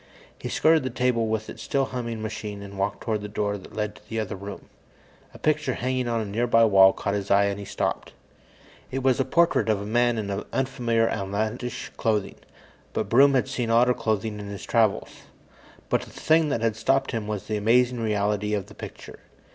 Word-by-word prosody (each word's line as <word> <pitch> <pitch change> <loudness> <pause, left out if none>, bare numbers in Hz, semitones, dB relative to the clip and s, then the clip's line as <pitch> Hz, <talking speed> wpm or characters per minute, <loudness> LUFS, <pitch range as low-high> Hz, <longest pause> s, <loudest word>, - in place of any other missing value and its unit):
He - - -5
skirted 160 0 +4
the 130 - -3
table 120 -2 +1
with 110 0 -2
its - - -9
still 135 -1 0
humming 115 -4 -4
machine 105 -2 -5
and 100 0 -9
walked 100 +1 -1
toward 110 -2 -1
the 105 - -5
door 105 0 -1
that 95 - -14
led 105 -1 -2
to 105 - -19
the 115 - -2
other 105 -2 -3
room. 100 +1 -8 0.7
A - - -13
picture 150 -4 0
hanging 130 0 -1
on 115 -1 0
a - - -3
nearby 115 +2 +3
wall 95 -2 +7
caught 100 - -3
his 100 -1 -3
eye, 100 +1 +5
and 100 0 -2
he 100 - -7
stopped. - - -3 0.8
It 135 0 -3
was 130 -1 +3
a - - +4
portrait 170 -2 +2
of 105 -2 +2
a 100 - -5
man 120 +2 +2
in 100 -2 -3 0.2
unfamiliar, 120 -4 +1
outlandish 110 +4 -3
clothing, 105 -3 0 0.6
but - - -2
Broom 135 +3 +6
had 130 - +2
seen 125 -4 -2
odder 120 +2 +4
clothing 110 -2 -2
in 100 - -7
his 100 -1 -7
travels. 110 -3 +1 0.8
But - - +1
the - - -11
thing 160 -1 +2
that 125 -5 -1
had 115 -2 +1
stopped 135 +4 +1
him 115 -4 -3
was 105 -3 -3
the 110 - -2
amazing 120 +3 +3
reality 105 -1 0
of 100 -3 -3
the - - -14
picture. - - -10
110 Hz, 205 wpm, -25 LUFS, 105-125 Hz, 0.8 s, wall